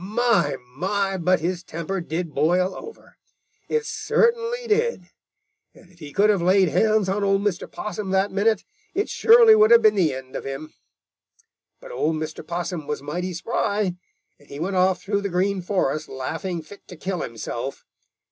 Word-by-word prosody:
My, 230 Hz, +3 st, +1 dB, 0.2 s
my, 195 Hz, +6 st, -1 dB
but 180 Hz, -1 st, +1 dB
his 175 Hz, +1 st, -2 dB
temper 170 Hz, +4 st, -4 dB
did 165 Hz, -1 st, -4 dB
boil 180 Hz, +6 st, +2 dB
over! 450 Hz, 0 st, -12 dB, 0.5 s
It 455 Hz, -1 st, 0 dB
certainly 470 Hz, +2 st, 0 dB
did. 465 Hz, +2 st, 0 dB, 0.6 s
And 180 Hz, -, -19 dB
if 175 Hz, -, -23 dB
he 150 Hz, -3 st, -9 dB
could 205 Hz, +4 st, +4 dB
have 200 Hz, -4 st, 0 dB
laid 185 Hz, +1 st, +4 dB
hands 215 Hz, +4 st, +2 dB
on 200 Hz, +2 st, -1 dB
old 195 Hz, 0 st, +2 dB
Mr. 195 Hz, -4 st, -2 dB
Possum 210 Hz, -2 st, -5 dB
that 190 Hz, +1 st, +1 dB
minute, 205 Hz, +1 st, +1 dB, 0.3 s
it 405 Hz, +3 st, 0 dB
surely 460 Hz, -1 st, +7 dB
would 430 Hz, 0 st, +5 dB
have 470 Hz, -1 st, +7 dB
been 215 Hz, -, +6 dB
the 180 Hz, -7 st, +2 dB
end 130 Hz, 0 st, -9 dB
of -, -, -4 dB
him. 135 Hz, +3 st, -7 dB, 1.1 s
"But -, -, -11 dB
old 160 Hz, -, 0 dB
Mr. 155 Hz, 0 st, -5 dB
Possum 170 Hz, -2 st, -4 dB
was 150 Hz, -2 st, -4 dB
mighty 175 Hz, +5 st, -4 dB
spry, 200 Hz, +1 st, -1 dB, 0.5 s
and 145 Hz, -, -22 dB
he 140 Hz, -, -8 dB
went 190 Hz, +4 st, -2 dB
off 185 Hz, 0 st, +2 dB
through 200 Hz, 0 st, -1 dB
the 200 Hz, -, -2 dB
Green 190 Hz, +2 st, 0 dB
Forest 175 Hz, -6 st, -1 dB
laughing 165 Hz, +6 st, -4 dB
fit 200 Hz, +6 st, -15 dB
to 180 Hz, -, -10 dB
kill 185 Hz, +1 st, -3 dB
himself. 115 Hz, -2 st, -5 dB
190 Hz, 175 wpm, -23 LUFS, 170-210 Hz, 1.1 s, surely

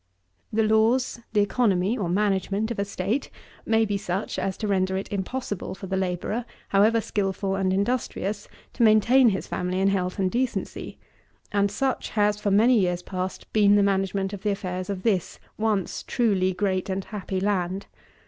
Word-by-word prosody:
7. 220 Hz, 0 st, +1 dB
The 220 Hz, -, +4 dB
laws, 235 Hz, +3 st, +2 dB
the 210 Hz, -2 st, +3 dB
economy, 205 Hz, -1 st, +2 dB
or 195 Hz, -8 st, -2 dB
management, 200 Hz, +3 st, 0 dB
of 230 Hz, -, -4 dB
a 200 Hz, -, +1 dB
state 200 Hz, +6 st, -2 dB, 0.4 s
may 225 Hz, 0 st, +3 dB
be 205 Hz, -1 st, -1 dB
such 190 Hz, 0 st, -3 dB
as 190 Hz, -, -2 dB
to 215 Hz, -, -3 dB
render 190 Hz, -1 st, +1 dB
it 195 Hz, -, -4 dB
impossible 205 Hz, 0 st, -3 dB
for 190 Hz, -, -8 dB
the 190 Hz, 0 st, -2 dB
labourer, 190 Hz, +5 st, -1 dB, 0.3 s
however 215 Hz, +4 st, +4 dB
skilful 195 Hz, -2 st, -1 dB
and 190 Hz, -1 st, +1 dB
industrious, 205 Hz, 0 st, -1 dB, 0.3 s
to -, -, -4 dB
maintain 235 Hz, +3 st, +6 dB
his 190 Hz, -2 st, -2 dB
family 180 Hz, +1 st, -2 dB
in 195 Hz, +1 st, +3 dB
health 185 Hz, -2 st, -1 dB
and 190 Hz, -2 st, +1 dB
decency; 250 Hz, +1 st, -3 dB, 0.5 s
and 200 Hz, 0 st, +2 dB
such 265 Hz, +6 st, -1 dB
has, 210 Hz, 0 st, +2 dB
for 205 Hz, -, 0 dB
many 225 Hz, +4 st, +5 dB
years 180 Hz, -2 st, 0 dB
past, 185 Hz, 0 st, -5 dB
been 205 Hz, -1 st, +5 dB
the 205 Hz, -, +4 dB
management 195 Hz, 0 st, 0 dB
of 200 Hz, -, -6 dB
the 210 Hz, -, 0 dB
affairs 185 Hz, -2 st, -3 dB
of 190 Hz, -2 st, -4 dB
this 195 Hz, -6 st, 0 dB, 0.2 s
once 215 Hz, -4 st, -1 dB
truly 200 Hz, -7 st, +1 dB
great 185 Hz, 0 st, -1 dB
and 190 Hz, 0 st, -2 dB
happy 195 Hz, -3 st, -4 dB
land. 190 Hz, -1 st, -1 dB
200 Hz, 175 wpm, -25 LUFS, 190-215 Hz, 0.5 s, maintain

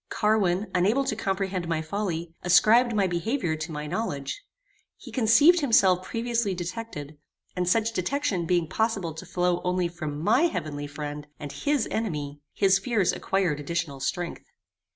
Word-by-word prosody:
Carwin, 210 Hz, -3 st, +1 dB
unable 205 Hz, +10 st, +2 dB
to 220 Hz, -, -1 dB
comprehend 190 Hz, -3 st, -2 dB
my 165 Hz, -1 st, 0 dB
folly, 170 Hz, -2 st, -3 dB
ascribed 225 Hz, +6 st, +5 dB
my 200 Hz, -2 st, +3 dB
behaviour 175 Hz, -, -1 dB
to 155 Hz, +2 st, -5 dB
my 150 Hz, -1 st, -5 dB
knowledge. 150 Hz, -, -3 dB, 0.5 s
He -, -, -12 dB
conceived 280 Hz, +9 st, +5 dB
himself 195 Hz, -, +4 dB
previously 230 Hz, -2 st, -1 dB
detected, 175 Hz, -5 st, -6 dB, 0.4 s
and 180 Hz, -1 st, 0 dB
such 225 Hz, +3 st, +2 dB
detection 195 Hz, -, -1 dB
being 175 Hz, -2 st, +2 dB
possible 200 Hz, -5 st, -1 dB
to 160 Hz, +4 st, -9 dB
flow 180 Hz, -1 st, 0 dB
only 180 Hz, 0 st, +1 dB
from 155 Hz, -4 st, -5 dB
MY 225 Hz, -, +3 dB
heavenly 145 Hz, -, -4 dB
friend, 145 Hz, 0 st, -6 dB
and 145 Hz, -2 st, -6 dB
HIS 255 Hz, -, 0 dB
enemy, 150 Hz, -10 st, -3 dB
his 195 Hz, -1 st, +3 dB
fears 205 Hz, -2 st, +1 dB
acquired 185 Hz, -6 st, 0 dB
additional 145 Hz, -2 st, -3 dB
strength. 175 Hz, +5 st, -3 dB
180 Hz, 150 wpm, -26 LUFS, 160-220 Hz, 0.5 s, ascribed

